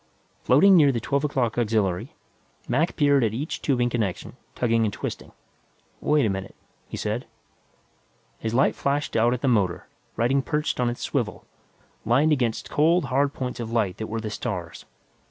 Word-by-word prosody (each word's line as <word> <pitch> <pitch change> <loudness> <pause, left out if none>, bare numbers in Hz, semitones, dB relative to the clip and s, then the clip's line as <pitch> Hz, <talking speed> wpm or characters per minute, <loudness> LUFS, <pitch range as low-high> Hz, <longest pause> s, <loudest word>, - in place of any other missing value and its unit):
Floating 190 +10 +6
near 150 -5 +6
the 120 - -1
twelve 140 +5 -1
o'clock 125 -6 0
auxiliary, 105 -6 0 0.5
Mac 150 +8 +1
peered 145 -3 +3
at 110 -1 0
each 145 +6 -4
tubing 125 -4 +1
connection, 110 -7 -3 0.2
tugging 115 -2 +1
and 105 - +1
twisting. - - -6 0.7
"Wait 150 -3 +2
a - - +2
minute," 95 0 -5 0.3
he - - -6
said. - - -3 1.1
His 110 0 -3
light 135 - +3
flashed 140 +1 -1
out 115 +2 +3
at 125 0 -2
the 135 - 0
motor, 100 -8 +1 0.3
riding 130 +4 +2
perched 150 0 -2
on 125 -1 +2
its 120 - -6
swivel, - - -2 0.6
limned 135 +7 +3
against 120 -6 -1
cold, 165 +2 +3
hard 140 +1 +2
points 125 -2 -5
of 115 -2 -4
light 110 -6 0
that 110 - -5
were 115 +1 -3
the 110 -1 -5
stars. 90 -7 -5
120 Hz, 170 wpm, -25 LUFS, 110-140 Hz, 1.1 s, Floating